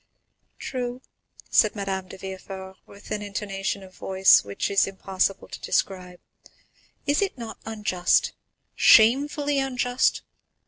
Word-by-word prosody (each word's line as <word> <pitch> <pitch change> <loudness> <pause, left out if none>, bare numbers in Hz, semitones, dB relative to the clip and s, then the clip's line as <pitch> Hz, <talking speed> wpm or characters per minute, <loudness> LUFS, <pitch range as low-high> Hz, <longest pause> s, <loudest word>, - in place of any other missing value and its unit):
"True," 250 0 -5 0.5
said 215 - +4
Madame 195 -2 -3
de 190 - -10
Villefort, 190 0 -8
with 200 +1 -15
an 210 -1 -2
intonation 200 -1 -4
of 185 -1 -14
voice 190 +1 +4
which 100 - -3
it - - -2
is 195 - +4
impossible 195 0 -2
to - - -9
describe; 180 -2 -2 0.9
"is 290 +4 +2
it 390 -8 -1
not 230 -2 -8
unjust—shamefully 230 +7 +2
unjust? 250 -2 0
200 Hz, 120 wpm, -25 LUFS, 190-245 Hz, 0.9 s, said